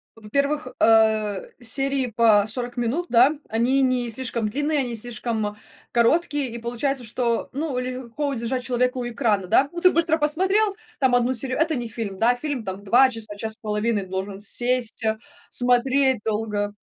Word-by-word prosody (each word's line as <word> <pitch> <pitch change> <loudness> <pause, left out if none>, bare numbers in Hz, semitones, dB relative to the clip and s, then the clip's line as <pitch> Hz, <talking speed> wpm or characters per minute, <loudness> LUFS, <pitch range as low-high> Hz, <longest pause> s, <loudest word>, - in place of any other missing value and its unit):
Во-первых, 280 +8 -1
э, 220 -3 +3
серии 270 +2 +1
по 215 -3 +5
40 245 +2 -3
минут, 260 +10 -1
да, 260 +6 +5
они 245 +5 +1
не 250 -2 +1
слишком 230 -2 -1
длинные, 290 +5 0
они 250 -2 -1
не 235 - -4
слишком 220 -2 -3 0.3
короткие, 285 +2 +1
и 235 - -6
получается, 245 +3 -2
что, 235 +1 -1
ну, 285 -2 -3
легко 255 +2 -4
удержать 250 0 -2
человека 250 0 0
у 245 -1 -3
экрана, 225 -6 0
да? 270 +9 +3
Ну, 345 - -5
ты 365 +1 +5
быстро 330 -1 +2
посмотрел 380 +7 +1 0.2
там 260 -3 +3
1 245 +1 +2
серию, 255 +1 -1
это 320 0 +1
не 240 -2 -3
фильм, 205 -4 -5
да, 245 +2 +4
фильм 275 -3 -4
там 190 +1 -6
2 250 +6 +5
часа, 220 -3 -5
час 220 +1 -3
с - - -6
половиной 210 -1 -1
должен 190 +1 -5
сесть, 240 +2 -1
а, 220 0 0 0.3
смотреть 255 +1 +2
долго. 210 -2 -2
245 Hz, 170 wpm, -23 LUFS, 220-270 Hz, 0.3 s, по